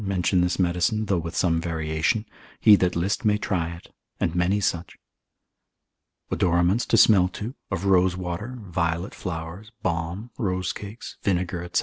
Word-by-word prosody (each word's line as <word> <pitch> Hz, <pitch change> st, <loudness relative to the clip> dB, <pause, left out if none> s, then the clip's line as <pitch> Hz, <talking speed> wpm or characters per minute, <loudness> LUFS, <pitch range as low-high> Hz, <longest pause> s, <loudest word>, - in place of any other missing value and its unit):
62, 100 Hz, -, -4 dB
mention 90 Hz, +1 st, +2 dB
this 90 Hz, 0 st, +1 dB
medicine, 90 Hz, +5 st, +1 dB
though 95 Hz, -4 st, +1 dB
with 85 Hz, 0 st, -6 dB
some 85 Hz, -2 st, +2 dB
variation; 80 Hz, +5 st, -1 dB, 0.3 s
he 105 Hz, -2 st, +8 dB
that 90 Hz, -2 st, +1 dB
list 95 Hz, +7 st, -1 dB
may 105 Hz, -2 st, +3 dB
try 85 Hz, -5 st, -1 dB
it, 85 Hz, -, -16 dB, 0.3 s
and 85 Hz, -, 0 dB
many 90 Hz, +4 st, +2 dB
such. 90 Hz, -4 st, -2 dB, 1.3 s
Odoraments 90 Hz, +6 st, +2 dB
to -, -, +3 dB
smell 95 Hz, -5 st, +6 dB
to, 105 Hz, +6 st, -6 dB, 0.2 s
of 95 Hz, -, -3 dB
rosewater, 95 Hz, +4 st, +1 dB
violet 85 Hz, 0 st, -2 dB
flowers, 85 Hz, +2 st, -6 dB
balm, 85 Hz, +6 st, -3 dB
rose 95 Hz, -4 st, -1 dB
cakes, 105 Hz, +3 st, -9 dB
vinegar, 90 Hz, -2 st, -1 dB
&c. -, -, +3 dB
90 Hz, 150 wpm, -25 LUFS, 85-100 Hz, 1.3 s, he